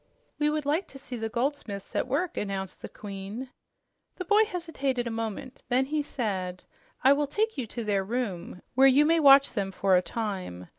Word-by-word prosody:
"We 295 0 +3
would 300 -1 -1
like 310 +7 0
to 275 - -11
see 260 -2 -8
the 225 -1 -3
goldsmiths 235 -5 -3
at - - 0
work," 295 +7 -1
announced 195 -2 -4
the - - -7
Queen. 205 +5 -7 0.6
The 365 - -5
boy 420 +4 +5
hesitated 320 - -2
a 235 - -3
moment. 225 +2 -5
Then 255 +2 +3
he 300 +2 0
said, 190 -10 -3 0.4
"I 270 - +7
will 290 0 0
take 435 +9 0
you 260 -6 -3
to 235 +2 -5
their 200 -2 +1
room, 190 -6 -4
where 265 +2 +6
you 275 +3 +6
may 330 +1 +4
watch 275 -2 +7
them 195 -3 -1
for 190 0 +2
a 180 - +5
time. 185 - -5
245 Hz, 195 wpm, -28 LUFS, 200-285 Hz, 0.6 s, I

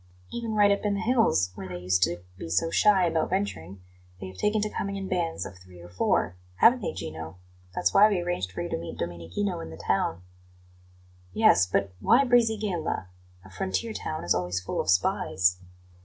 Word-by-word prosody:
Even 230 -2 -4
right 205 -1 +5
up 200 - 0
in 205 -1 0
the - - -2
hills, 225 - +2
where 95 - -8
they 90 -1 -6
used 90 +1 0
to 85 0 +1
be 85 - -8
so 95 - +1
shy 200 -2 +4
about 165 -2 0
venturing, 100 - -3 0.4
they 95 - -7
have 95 - -13
taken 210 - +1
to 210 - 0
coming 200 -1 -4
in 195 -1 -4
bands 175 -3 -2
of 95 - -10
three 90 -1 -16
or 85 0 -12
four 90 0 0 0.2
haven't 240 - +5
they, 195 - -2
Gino? 80 +1 -7 0.4
That's 90 +1 +1
why 210 +1 +7
we 200 -4 0
arranged 175 - -2
for 90 - -4
you - - -5
to - - -2
meet 85 - -7
Domenichino 85 +3 -3
in 80 0 -7
the 80 - -10
town." 90 -3 -1 1.1
"Yes; 90 - +5
but 95 +1 -1
why 250 - +4
Brisighella? 215 - +1 0.4
A - - -13
frontier 195 - -2
town 155 -6 -4
is 85 - +2
always 90 0 -1
full 90 - -3
of - - -5
spies." 90 0 +2
95 Hz, 200 wpm, -27 LUFS, -, 1.1 s, why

